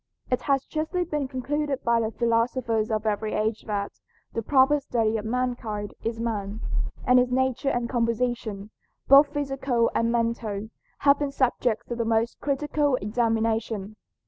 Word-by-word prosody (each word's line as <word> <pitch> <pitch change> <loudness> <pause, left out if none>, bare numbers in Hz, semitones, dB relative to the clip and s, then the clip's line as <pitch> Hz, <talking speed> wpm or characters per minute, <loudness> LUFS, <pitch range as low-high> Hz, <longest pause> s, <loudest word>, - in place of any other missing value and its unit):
It 250 - +1
has 275 -2 +1
justly 320 +4 -1
been 300 -5 -2
concluded 280 +2 -2
by 235 0 +3
the 220 -1 0
philosophers 230 -1 0
of 215 -1 -1
every 215 0 -1
age 215 +1 0
that 200 -1 -3 0.3
"The 230 - -1
proper 270 +4 +4
study 225 -5 0
of 210 - -5
mankind 230 -4 -2
is 225 0 -2
man," 215 -3 -3 0.5
and 250 0 +6
his 250 0 +1
nature 260 +1 +1
and 245 -2 -1
composition, 230 -3 -1 0.4
both 280 +2 +8
physical 270 -5 0
and 230 0 +1
mental, 230 -3 -1 0.3
have 280 0 +5
been 290 -1 -1
subjects 245 -3 0
of 240 - -3
the 230 - +1
most 225 +1 0
critical 290 0 +1
examination. 225 -1 -1
235 Hz, 150 wpm, -26 LUFS, 220-265 Hz, 0.5 s, both